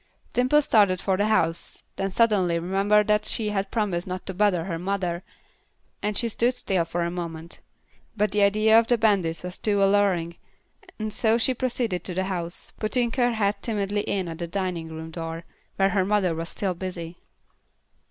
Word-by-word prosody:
Dimple 255 +5 +3
started 200 -8 +4
for 190 0 0
the 205 +3 +1
house; 165 -6 0
then 195 - -2
suddenly 190 -5 +2
remembered 195 +4 +2
that 210 0 +2
she 215 -1 -1
had 200 -1 -2
promised 195 -6 -1
not 185 0 -5
to 190 - -5
bother 185 -3 +2
her 170 -2 -4
mother, 180 -2 -2 0.8
and 210 0 -1
she 235 - +1
stood 235 +3 +1
still 190 -8 0
for 170 +1 -2
a 170 - -2
moment. 170 -1 -6 0.6
But 210 -1 +1
the 210 - +1
idea 215 +2 +5
of 230 - 0
the 240 - +3
bandits 195 -8 +1
was 180 0 -6
too 205 -2 +2
alluring, 195 -4 +2 0.6
and 215 -1 -4
so 225 +1 +2
she 245 +3 +2
proceeded 240 -6 -1
to 180 - -3
the 190 - 0
house, 175 -2 -3
putting 235 +2 0
her 245 -1 +1
head 205 -2 0
timidly 205 -2 -1
in 195 -3 -2
at 165 0 -7
the 170 - -3
dining 175 -3 -3
room 160 0 -7
door, 165 0 -5 0.3
where 195 0 +3
her 195 -2 +2
mother 195 -3 +1
was 165 +1 -4
still 195 -3 -2
busy. 175 -2 -6
195 Hz, 185 wpm, -25 LUFS, 175-210 Hz, 0.8 s, idea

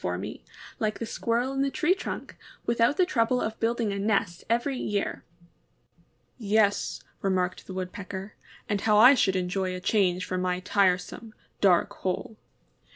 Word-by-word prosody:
for - - -2
me, - - -7 0.4
like 215 -1 -1
the 230 - -4
Squirrel 235 +3 -1
in 270 - 0
the 275 - +2
tree 320 +6 +2
trunk, 380 - -6 0.3
with 235 0 0
out 245 +6 +4
the 365 - +4
trouble 250 -6 +1
of 220 -1 -3
building 230 -2 0
a 200 - -3
nest 195 -4 0
every 240 +4 +1
year." 205 -5 -2 1.2
^^Yes," 210 -1 +1 0.2
remarked 185 -1 -1
the 190 - -7
Woodpecker, 190 +2 -6 0.3
^^and 205 -2 -1
how 210 -1 +3
I 250 +6 +9
should 195 -7 +2
enjoy 185 0 -1
a - - -5
change 185 -2 +1
from 185 0 -2
my 180 0 0
tire 185 -1 +3
some, 215 +4 -10 0.2
dark 180 -4 +3
hole." 190 +4 -3
205 Hz, 165 wpm, -27 LUFS, 185-230 Hz, 1.2 s, I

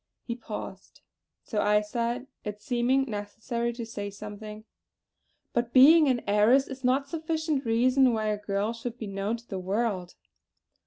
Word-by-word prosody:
He 235 - -4
paused; 210 -5 -8 0.4
so 210 - -1
I 210 0 +3
said 235 +4 -2 0.2
it 210 0 -5
seeming 255 +1 +1
necessary 225 +2 -3
to 235 -1 -6
say 205 -3 -5
something: 210 +1 -9 0.9
"But 240 0 -1
being 300 +4 +8
an 250 -3 +1
heiress 215 +7 +4
is 265 -1 -9
not 265 +3 +2
sufficient 315 -2 -2
reason 250 +3 +4
why 215 -2 0
a 210 - 0
girl 205 +2 -1
should 235 +1 -6
be 225 - -5
known 200 +3 -2
to 235 +1 -18
the 190 - -4
world." 190 -1 -2
230 Hz, 155 wpm, -28 LUFS, 210-255 Hz, 0.9 s, being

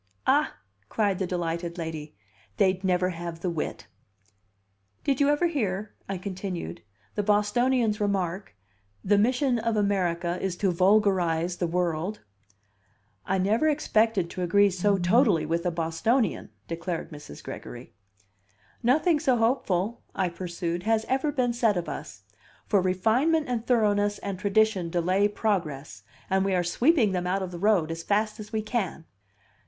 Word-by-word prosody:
"Ah!" - - +2 0.3
cried 205 -4 0
the 190 - -1
delighted 170 -1 -3
lady, 160 - -6 0.4
"they'd 190 -1 +2
never 180 -1 +2
have 170 -1 -6
the 180 - -1
wit!" 160 -3 -4 1.2
"Did 275 -1 +1
you 285 - +4
ever 295 +4 +2
hear," 210 - -2 0.2
I 195 - -2
continued, 185 - -5 0.3
"the 210 - 0
Bostonian's 210 +2 +2
remark 190 - -2 0.5
'The 205 +1 +3
mission 250 +2 +2
of 225 -1 -1
America 180 -4 0
is 190 -2 -1
to 195 -1 +1
vulgarize 180 -3 +2
the 175 - -1
world'?" 175 +3 -1 1.1
"I 195 - +1
never 210 +10 +2
expected 220 - +1
to 185 - -5
agree 200 +3 +4
so 195 +2 +1
totally 185 - +3
with 170 +3 -1
a - - +1
Bostonian!" 170 +7 0 0.2
declared 170 +1 -4
Mrs. 145 - -10
Gregory. 120 +1 -9 0.9
"Nothing 300 +7 +3
so 260 -3 +2
hopeful," 225 -3 0
I 185 -2 +1
pursued, 175 -1 -4
"has 220 +2 +1
ever 270 +3 +1
been 250 -4 0
said 230 -5 +2
of 170 -2 -3
us. 95 -8 -7 0.4
For 200 - +2
refinement 230 - +2
and 240 -2 -3
thoroughness 205 -4 +2
and 195 -2 -5
tradition 200 -3 +2
delay 185 +4 +2
progress, 165 - -2 0.3
and 190 0 +2
we 195 -1 +1
are 180 - +2
sweeping 235 - +3
them 180 -1 -2
out 190 +1 0
of 185 - -5
the 175 - -7
road 190 -5 +2
as 165 0 -4
fast 215 +4 0
as 210 0 -9
we 220 -1 -1
can." 210 -7 -3
195 Hz, 150 wpm, -27 LUFS, 175-220 Hz, 1.2 s, you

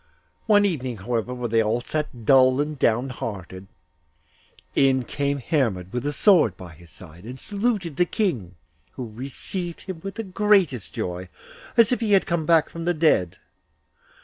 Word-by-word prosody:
One 205 -2 +5
evening, 130 - -2
however, 115 +4 -2
while 125 -1 -3
they 115 0 +2
all 110 +2 0
sat 125 -3 -4
dull 130 0 +5
and 150 -1 -2
down 120 +3 +2
hearted, 95 -6 -7 1.1
in 135 -2 +3
came 140 +2 -1
Hermod 115 - -1
with 125 +3 -2
a - - 0
sword 155 - +4
by 90 -2 -10
his 85 +2 -17
side, 85 0 -13
and 125 +4 -8
saluted 200 - -2
the 175 - +4
King, 130 - -2 0.4
who 120 -4 -7
received 150 - -5
him 185 -4 -7
with 195 -1 -6
the 225 - -4
greatest 190 - +2
joy, 90 +1 -5 0.5
as 230 -1 +6
if 250 - +1
he 220 -3 +1
had 195 - +4
come 165 -3 -1
back 165 -2 +4
from 165 0 -7
the 175 0 +1
dead. 150 - +2
135 Hz, 170 wpm, -24 LUFS, 115-175 Hz, 1.1 s, as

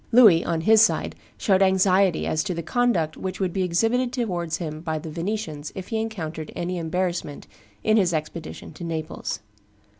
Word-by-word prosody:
Louis, 215 -9 +7
on 165 -1 -1
his 220 +4 +6
side, 225 - +2 0.2
showed 195 -2 +2
anxiety 190 -1 +3
as 155 0 0
to 180 - -2
the 170 - -4
conduct 185 -9 +1
which 190 0 -4
would 185 -3 -1
be 195 - 0
exhibited 225 +8 +1
towards 180 - -2
him 155 -3 -5
by 160 -1 -2
the 155 0 -7
Venetians 170 -3 -4
if 190 -1 -7
he 225 -1 0
encountered 160 -8 -5
any 180 +1 -2
embarrassment 170 -2 -2 0.4
in 215 0 +4
his 185 -5 +3
expedition 160 0 -5
to - - -9
Naples. 160 -2 -4
180 Hz, 175 wpm, -24 LUFS, 160-205 Hz, 0.4 s, Louis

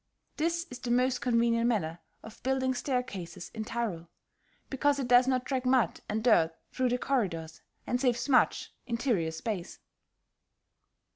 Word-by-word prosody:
This 335 +2 0
is 250 - -7
the 245 - -5
most 250 +1 +2
convenient 230 -1 +2
manner 175 -8 -1 0.2
of 220 - -12
building 260 0 +1
staircases 225 - -4
in 220 - -4
Tyrol, 215 -8 -3 0.6
because 285 +1 +1
it 270 -3 -2
does 245 +1 +6
not 255 -1 +1
track 260 -2 -1
mud 255 -7 +2
and 220 +1 -1
dirt 165 -9 +4 0.2
through 255 -1 0
the 245 - +1
corridors, 175 -13 -2 0.2
and 245 0 -1
saves 250 -1 +1
much 265 -3 +2
interior 230 -8 0
space. 180 +2 -5
245 Hz, 145 wpm, -30 LUFS, 210-260 Hz, 0.6 s, does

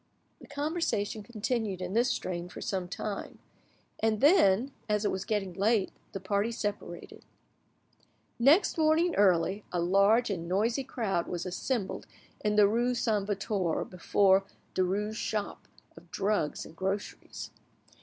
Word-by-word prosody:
The - - -14
conversation 285 -8 -2
continued 220 -2 -2
in 180 0 -4
this 240 +3 +3
strain 180 -7 -3
for - - -9
some 185 -2 -2
time, 200 +2 -5 0.6
and 220 -1 +1
then, 265 - +5 0.2
as 210 0 +1
it - - +2
was 190 - -3
getting 200 -4 -1
late, 200 +2 +1 0.2
the 195 - -5
party 200 +4 0
separated. 205 -6 -5 1.2
Next 300 - +4
morning 320 +3 +3
early, 190 +1 +3
a 180 - -1
large 200 +6 +3
and 170 -3 -4
noisy 225 +8 +1
crowd 215 -9 -2
was 175 0 -4
assembled 195 +3 -3 0.4
in 210 0 +1
the 210 -1 +6
rue 240 +4 +1
Saint 210 -4 0
Victor 200 -4 -1
before 190 +2 +3 0.3
Derues' 205 +4 0
shop 210 -2 -3 0.3
of 170 - -15
drugs 195 -3 -1
and 160 - -13
groceries. 195 +3 -4
205 Hz, 135 wpm, -30 LUFS, 190-230 Hz, 1.2 s, the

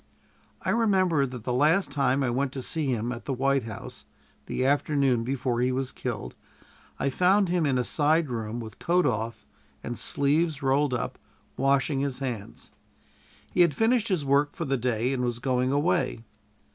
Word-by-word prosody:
I - - 0
remember 185 -10 +2
that 125 -3 -8
the 125 - -2
last 155 +9 +3
time 140 -1 +1
I 125 - 0
went 130 +2 0
to 130 - -5
see 155 +1 -1
him 120 -2 -1
at 120 -1 -7
the 140 - -2
White 135 -1 +1
House 110 -3 -8 0.4
the 130 - -1
afternoon 140 -3 +2
before 125 -1 -1
he 125 +1 +2
was 130 0 -2
killed 105 - -5 0.6
I 140 - 0
found 185 +5 +3
him 175 -3 +1
in 130 -2 +1
a 125 - +1
side 155 +5 +2
room 115 -2 -4
with 110 -2 -9
coat 180 +1 +2
off 115 -3 -2 0.4
and 120 - -5
sleeves 150 +1 +1
rolled 135 0 +2
up, 120 - -4 0.4
washing 135 +1 +1
his 140 -2 -2
hands. 125 -7 -6 0.8
He 180 - +2
had 170 -5 +4
finished 230 - +2
his 180 -8 0
work 140 +2 +2
for 165 - -3
the 135 -1 0
day, 125 0 0
and 125 -2 -1
was 120 -1 -1
going 125 0 0
away. 150 -4 0
135 Hz, 180 wpm, -27 LUFS, 125-150 Hz, 0.8 s, had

